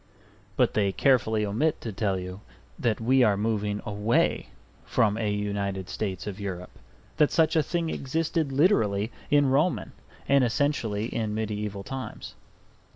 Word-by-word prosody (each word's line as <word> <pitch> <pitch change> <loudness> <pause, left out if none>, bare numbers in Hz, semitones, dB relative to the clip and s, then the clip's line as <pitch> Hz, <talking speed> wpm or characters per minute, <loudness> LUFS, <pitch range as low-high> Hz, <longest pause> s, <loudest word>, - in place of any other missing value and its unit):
But - - +2
they 100 -2 +2
carefully 110 -3 +2
omit 140 +10 0
to 115 - -4
tell 100 -1 -1
you 90 +2 -7 0.4
that 115 -3 0
we 130 +3 +3
are 105 -5 +4
moving 105 -1 -1
away 105 +3 +1 0.4
from 105 -2 +2
a 110 -1 -1
United 100 -2 -2
States 95 -4 -3
of 105 -1 -6
Europe, 90 -3 -5 0.5
that 150 - +4
such 160 -1 +3
a 160 - +5
thing 165 +1 -2
existed 160 +1 -1
literally 115 - +2 0.2
in 145 -2 +4
Roman 150 +7 +1 0.4
and 140 -1 +4
essentially 115 -4 0
in 110 -2 -2
mediaeval 105 -2 -3
times. 130 +4 -7
110 Hz, 145 wpm, -27 LUFS, 100-135 Hz, 0.5 s, a